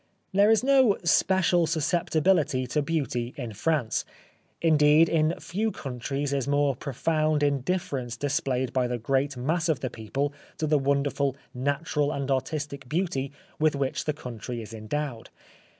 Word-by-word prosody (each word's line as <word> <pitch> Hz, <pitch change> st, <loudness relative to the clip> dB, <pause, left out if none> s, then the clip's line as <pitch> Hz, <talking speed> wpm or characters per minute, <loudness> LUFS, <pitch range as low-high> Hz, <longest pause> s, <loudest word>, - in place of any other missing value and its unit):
There 200 Hz, +2 st, +5 dB
is 225 Hz, +1 st, +4 dB
no 260 Hz, -6 st, +5 dB
special 175 Hz, -1 st, +3 dB
susceptibility 160 Hz, -3 st, +1 dB
to 150 Hz, +5 st, 0 dB
beauty 140 Hz, -5 st, -2 dB
in 120 Hz, -5 st, -5 dB
France; 120 Hz, +2 st, 0 dB, 0.6 s
indeed, 155 Hz, 0 st, +5 dB
in 160 Hz, +1 st, +1 dB
few 215 Hz, +5 st, -1 dB
countries 135 Hz, -, -4 dB
is 135 Hz, -1 st, -1 dB
more 145 Hz, -1 st, +2 dB
profound 155 Hz, +3 st, 0 dB
indifference 140 Hz, -4 st, -1 dB
displayed 130 Hz, -2 st, -1 dB
by 125 Hz, -2 st, +1 dB
the 125 Hz, 0 st, -2 dB
great 135 Hz, +3 st, 0 dB
mass 160 Hz, +6 st, 0 dB
of 150 Hz, -5 st, +1 dB
the 130 Hz, -, -3 dB
people 135 Hz, +6 st, -3 dB, 0.2 s
to 155 Hz, -, -1 dB
the 150 Hz, -1 st, +3 dB
wonderful 140 Hz, 0 st, 0 dB, 0.2 s
natural 145 Hz, +3 st, 0 dB
and 140 Hz, -1 st, -2 dB
artistic 140 Hz, 0 st, -3 dB
beauty 150 Hz, -5 st, -1 dB, 0.3 s
with 155 Hz, -1 st, +3 dB
which 140 Hz, -1 st, -2 dB
the 150 Hz, -, 0 dB
country 125 Hz, -3 st, -6 dB
is 115 Hz, 0 st, -8 dB
endowed. 115 Hz, +2 st, -4 dB
145 Hz, 145 wpm, -27 LUFS, 130-160 Hz, 0.6 s, There